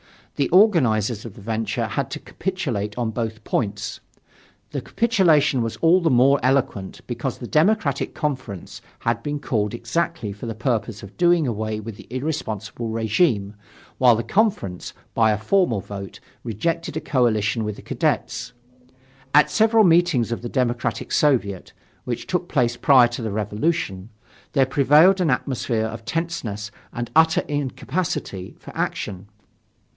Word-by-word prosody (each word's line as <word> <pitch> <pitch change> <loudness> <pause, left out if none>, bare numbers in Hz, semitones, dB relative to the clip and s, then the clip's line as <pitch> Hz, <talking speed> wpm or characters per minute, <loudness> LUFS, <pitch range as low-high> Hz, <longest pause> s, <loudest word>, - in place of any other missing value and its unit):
The 140 - 0
organizers 125 - +3
of 115 -4 -9
the - - -12
venture 110 +1 -2
had - - -2
to - - -4
capitulate 125 - -3
on 120 -2 -1
both 110 -1 -4
points. 105 -2 -2 0.7
The - - -3
capitulation 170 - +3
was 115 -1 -2
all 170 +3 +4
the 165 - +2
more 135 +2 +5
eloquent, 130 -7 0
because - - -4
the - - -7
Democratic 155 -4 +1
Conference 135 - -4 0.2
had 115 0 0
been 145 +3 -3
called 110 -6 -1
exactly 120 -4 -2
for 105 +4 -8
the 115 - -4
purpose 115 -3 -2
of 100 - -11
doing 175 -2 +4
away 110 -2 -2
with 110 -1 -8
the - - -13
irresponsible 120 -5 -4
regime, 110 - +1 0.5
while 125 -2 +6
the 115 - -2
Conference, 180 - 0 0.2
by 110 -1 +4
a 105 - +2
formal 120 - +1
vote, 100 0 -8 0.2
rejected 160 - -2
a - - -2
coalition 115 -5 +1
with 105 -1 -3
the - - -13
Cadets. 125 - -1 0.8
At 150 - +6
several 225 0 +4
meetings 165 - +3
of 115 - -3
the 120 - -5
Democratic 120 -2 -1
Soviet 115 -11 +1 0.3
which 120 -2 -3
took 180 -1 -2
place 120 -4 +1
prior 130 -1 +6
to 120 +1 -5
the 110 - -2
Revolution, 105 - -2 0.4
there 135 -3 +4
prevailed 150 +8 +5
an 170 - +2
atmosphere 125 -3 0
of 110 0 -6
tenseness 120 -9 -3 0.2
and 120 0 -5
utter 160 +3 +5
incapacity 145 - -3
for - - -13
action. 100 0 -3
120 Hz, 150 wpm, -22 LUFS, 110-155 Hz, 0.8 s, while